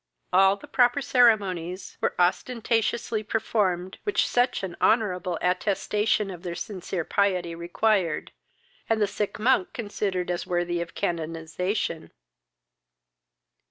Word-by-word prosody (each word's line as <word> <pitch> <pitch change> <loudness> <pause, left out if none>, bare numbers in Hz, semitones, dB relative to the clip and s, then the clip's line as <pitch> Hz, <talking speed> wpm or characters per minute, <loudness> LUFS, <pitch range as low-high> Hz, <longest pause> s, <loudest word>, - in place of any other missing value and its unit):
All 190 +1 +6
the 200 - -13
proper 245 +2 +3
ceremonies 200 -9 +1
were - - 0
ostentatiously 225 +4 0
performed 200 -4 -1
which 410 - +1
such 245 -3 +1
an 180 -2 -4
honourable 185 -6 +2
attestation 205 +3 +1
of 175 -2 -9
their 175 -2 -5
sincere 185 -4 -4
piety 185 -4 +1
required, 175 0 0 0.6
and 225 -1 +2
the 210 - +4
sick 205 +1 -3
monk 265 +12 +2
considered 205 - -2
as 175 - -3
worthy 175 -1 0
of 170 - -7
canonization. 165 +1 -2
195 Hz, 115 wpm, -26 LUFS, 175-220 Hz, 0.6 s, All